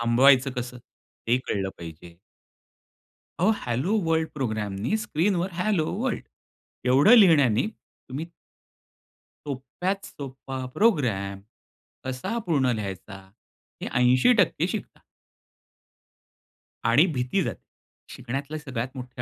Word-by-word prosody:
थांबवायचं 130 +3 +5
कसं, 125 0 -4 0.5
ते 120 +2 +4
कळलं 95 -1 -1
पाहिजे. 85 0 -10 1.2
अहो, 185 +5 +4 0.2
हॅलो 130 - 0
वर्ल्ड 160 0 +1
प्रोग्रॅमनी, 110 - -2
स्क्रीनवर 185 -2 0
हॅलो 180 -4 +1 0.2
वर्ल्ड - - -1 0.7
एवढं 140 - +7
लिहिण्याने, 150 - +5
तुम्ही 160 - -9 1.2
सोप्यात 145 +9 -3
सोपा 135 -1 -8 0.2
प्रोग्राम 115 - +1 0.6
कसा 130 - -3
पूर्ण 135 -7 +2
लिहायचा, 100 0 -6 0.6
हे - - -3
80% 155 - +4
शिकतात. 210 +1 -6 1.8
आणि 120 +8 +5
भीती 130 +9 0
जाते. - - -5 0.5
शिकण्यातलं 135 +4 -5
सगळ्यात 130 -5 -4
मोठी 125 -1 -7
130 Hz, 95 wpm, -26 LUFS, 120-165 Hz, 1.8 s, एवढं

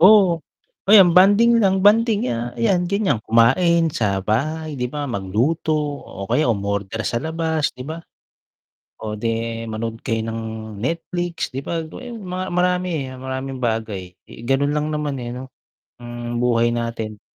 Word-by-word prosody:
Oo. 185 -3 +6 0.5
O, - - +4
yan, 190 -5 +8
bonding 215 +5 +6
lang, 190 -1 +3
bonding, 220 - +4
ya 120 0 -2
ayan, 175 +9 +2
ganiyan, 190 - +1
kumain 165 - +4
sa 100 -3 0
bahay, 155 +7 -1
'di 125 -2 -3
ba? 145 -1 -3
Magluto 120 - -1 0.3
o 100 0 -8
kaya 150 +1 +2
umorder 100 +1 -2
sa 115 - -1
labas, 160 -1 -1
'di 125 - -9
ba? 165 +1 -6 1.0
O 105 -1 -4
'di 115 +1 -2
manonood 115 +1 -4
kayo 115 -1 0
ng 115 0 -4 0.4
Netflix, 170 - -3
'di 135 +1 -6
ba? 165 -1 -2
Mga 160 +9 -9
yun, 225 - -8
mga 185 0 -4
marami 180 0 +1 0.3
maraming 130 0 -5
bagay. 110 -6 -3 0.2
Eh, 115 - -11
ganun 135 +2 +2
lang 150 +1 -1
naman, 150 -2 -2
eh, 120 -1 -5
'no, 130 +1 -8 0.5
ang 120 0 -4
buhay 120 -1 +2
natin. 115 -3 -4
130 Hz, 155 wpm, -21 LUFS, 115-170 Hz, 1.0 s, yan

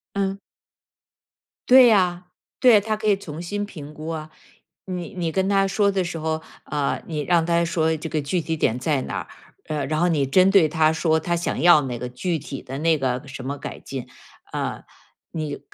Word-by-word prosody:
嗯。 195 0 -1 1.3
对 255 -1 +9
呀， 180 -4 +2 0.3
对， 235 -5 +6
他 215 +1 -2
可 215 - -3
以 205 - +5
重 165 -5 -8
新 205 +4 -3
评 150 -7 -10
估 155 +1 -8
啊。 155 -1 -5 0.6
你 180 -3 -5
你 170 -3 -2
跟 190 +2 0
他 195 -1 +3
说 200 +1 +2
的 190 -1 0
时 170 -1 -4
候， 160 0 -2 0.2
呃， 145 -2 -1
你 155 -3 -3
让 170 +1 +2
他 170 0 +2
说 160 -1 +1
这 160 +1 -6
个 155 - -1
具 170 +5 -1
体 160 0 -3
点 120 -5 +1
在 135 +1 0
哪 - - -4
儿， - - -8 0.4
呃， 150 -3 -1
然 155 +2 -1
后 175 - +3
你 145 -4 +1
针 185 +8 +4
对 195 -5 +6
他 155 0 +3
说 160 -1 +1
他 175 0 -1
想 170 -5 -2
要 175 -3 +7
那 125 -3 -4
个 125 +1 -5
具 160 +7 -2
体 140 -2 -7
的 135 +1 -7
那 160 0 +3
个 130 -2 -2
什 130 -1 -8
么 140 +2 -3
改 - - -7
进。 135 -3 -7 0.4
呃， - - -3 0.5
你 155 -3 -4
160 Hz, 215 characters per minute, -23 LUFS, 150-185 Hz, 1.3 s, 对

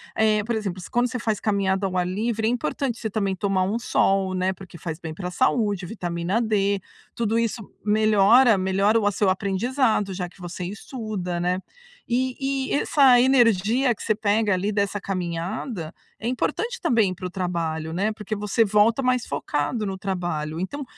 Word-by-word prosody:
eh, 215 -1 +3
por 235 +3 -2
exemplo, 195 -4 -3
se - - -10
quando 240 +1 +2
você 255 - -3
faz 220 -3 -1
caminhada 195 -2 0
ao 185 -1 -3
ar 180 - +1
livre, 220 +4 -1
é - - +3
importante 240 - -2
você 220 - -3
também 200 -2 -1
tomar 195 -1 0
um 205 +5 -1
sol, 195 -4 +1
né, 185 +1 0
porque 185 -2 -12
faz 165 0 -6
bem 160 -3 -6
pra 180 +2 -5
saúde, 205 -4 +1
vitamina 175 +1 -2
D. 200 -3 +1 0.4
Tudo 230 0 +1
isso 230 0 -1 0.2
melhora 215 +2 +5
melhora 195 +4 +2
o 210 - -1
a - - +3
seu 200 0 +1
aprendizado, 210 +2 0
já 180 -1 -3
que 185 - -22
você 175 +1 -6
estuda, 200 -3 -4
né. 180 +1 0 0.5
E 255 +1 0 0.3
e - - -1
essa 275 -3 +5
energia 240 -1 +3
que - - -10
você 215 - +2
pega, 210 0 +1
ali, 190 +3 0
dessa 200 0 0
caminhada, 180 - -4 0.3
é 225 - -4
importante 455 - -1
também 225 - +2
para 185 +1 -8
o - - -7
trabalho, 165 -4 -3
né, 200 +5 0
porque 215 0 -5
você 210 +2 +1
volta 210 +5 +3
mais 250 -2 +1
focado 210 - -2
no 195 -1 -3
trabalho. 175 -5 -3
Então, 285 +11 -4
205 Hz, 185 wpm, -24 LUFS, 185-230 Hz, 0.5 s, melhora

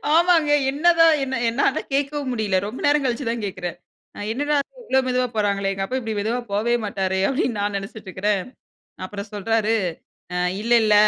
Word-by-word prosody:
ஆமாங்க. 335 -2 +4 0.2
என்னதான் 330 +2 +5
என்ன 265 0 -2
என்னால 235 +5 +1
கேட்கவும் 280 -1 -1
முடியல, 215 -5 0
ரொம்ப 225 - -7
நேரம் 290 0 +3
கழிச்சு 250 +1 -1
தான் 230 -1 -2
கேட்கிறேன். 180 -3 -5 0.5
என்னடா 290 +5 0 0.3
இவ்ளோ 265 - +2
மெதுவா 250 0 +1
போறாங்களே 200 -2 +1
எங்க 195 0 -3
அப்பா 255 - -2
இப்டி 225 -2 -4
மெதுவா 225 +4 -1
போவே 215 +4 +1
மாட்டாரே 190 -2 -1
அப்டின்னு 255 -4 0
நான் 205 0 -1
நெனைச்சிட்டுருக்கிறேன் 200 -1 -2 0.6
அப்புறம் 200 +2 -6
சொல்றாரு 225 +2 +1 0.6
அ - - 0 0.2
இல்ல 235 +2 -1
இல்ல 215 -1 +4
225 Hz, 155 wpm, -22 LUFS, 200-270 Hz, 0.6 s, என்னதான்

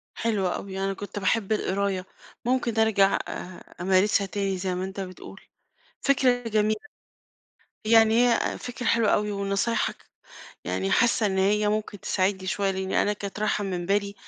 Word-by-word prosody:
حلوة 205 -5 0
أوي، 190 -1 -6
أنا 195 0 -1
كنت 205 +1 -6
باحب 205 +1 0
القراية، 195 -2 0 0.4
ممكن 240 -2 0
أرجع 205 -3 +4
أ - - -7 0.5
أمارسها 190 +2 +3
تاني 195 -1 -2
زي 185 0 -2
ما 180 - -3
أنت 190 +1 -6
بتقول، 185 -1 -8 0.6
فكرة 255 -3 +2
جميلة، 215 0 +1 1.1
يعني 225 0 +6
هي - - +3
أ - - -1
فكرة 245 0 -6
حلوة 230 -2 +3
أوي 210 0 +1
ونصايحك 200 +3 0 0.7
يعني 95 +2 -2
حاسة 235 -2 +3
إن 190 -1 -1
هي 210 +2 +2
ممكن 210 -1 -2
تساعدني 190 0 0
شوية، 195 +1 0
لإني 190 0 0
أنا 205 - +1
كانت 205 0 -6
رايحة 210 -1 0
من 180 -3 -3
بالي 200 +1 0
200 Hz, 155 wpm, -26 LUFS, 190-215 Hz, 1.1 s, يعني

